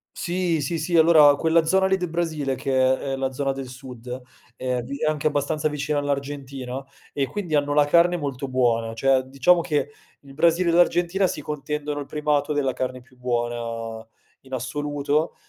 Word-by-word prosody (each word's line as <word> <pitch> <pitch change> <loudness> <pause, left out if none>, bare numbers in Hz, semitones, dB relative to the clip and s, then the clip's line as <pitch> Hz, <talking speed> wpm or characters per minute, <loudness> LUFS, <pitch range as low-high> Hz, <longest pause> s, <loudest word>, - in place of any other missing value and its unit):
Sì, 175 -2 -1
sì, 160 +4 -2
sì, 170 +2 0
allora 155 -3 +7
quella 165 +2 +3
zona 190 +4 +3
lì 190 0 +3
del 180 -2 -3
Brasile, 160 -5 -1
che 130 0 +2 0.2
è - - 0
la 135 0 -2
zona 135 +1 -1
del 135 -1 -6
sud, 125 -1 -8 0.3
è 125 0 -2
di 135 +4 -6
è 155 - -2
anche 155 -1 0
abbastanza 150 +1 0
vicina 150 0 -1
all'Argentina 140 -2 -4 0.3
e 140 -2 0
quindi 190 -3 -5
hanno 145 0 +1
la 145 0 +5
carne 170 +4 +4
molto 140 -3 -4
buona. 120 -3 +1
Cioè 135 +3 +3
diciamo 140 +7 +3
che 150 -2 -1 0.3
il 140 -1 -14
Brasile 170 +4 +3
e - - +2
l'Argentina 175 +2 +3
si 150 - -4
contendono 150 0 -4
il 140 - -6
primato 150 -1 0
della 135 -3 0
carne 130 0 -4
più 130 +1 -23
buona 120 -2 -3 0.4
in 135 0 -14
assoluto, 145 +4 -1
145 Hz, 180 wpm, -24 LUFS, 130-155 Hz, 0.4 s, allora